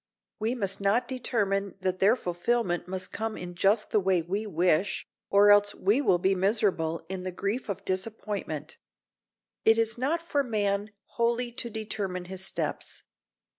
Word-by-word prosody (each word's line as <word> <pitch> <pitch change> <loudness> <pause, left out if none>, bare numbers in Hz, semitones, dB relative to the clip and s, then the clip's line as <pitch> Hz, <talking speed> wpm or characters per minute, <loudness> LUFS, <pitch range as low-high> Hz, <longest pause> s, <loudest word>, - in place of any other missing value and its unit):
We 225 +3 0
must 195 -4 -2
not 200 +5 +2
determine 200 -6 -1
that 185 0 -1
their 200 +5 +5
fulfillment 180 -1 -1
must 185 0 -4
come 220 0 -3
in 175 0 -7
just 200 +4 +2
the 215 - +4
way 185 -3 +2
we 200 +6 -3
wish, 180 0 +1 0.2
or 205 +1 +6
else 205 0 +5
we 210 +8 +2
will 185 -10 +3
be 190 +2 +2
miserable 185 -5 +1
in 190 +1 -4
the 185 0 -4
grief 200 +7 -3
of 200 - -4
disappointment. 190 -5 -3 0.9
It 225 0 +5
is 225 0 +1
not 320 +6 0
for 290 -4 0
man 205 -3 0 0.3
wholly 235 +1 +1
to 235 0 -3
determine 200 -4 -4
his 190 +1 -4
steps. - - -2
200 Hz, 160 wpm, -28 LUFS, 185-225 Hz, 0.9 s, or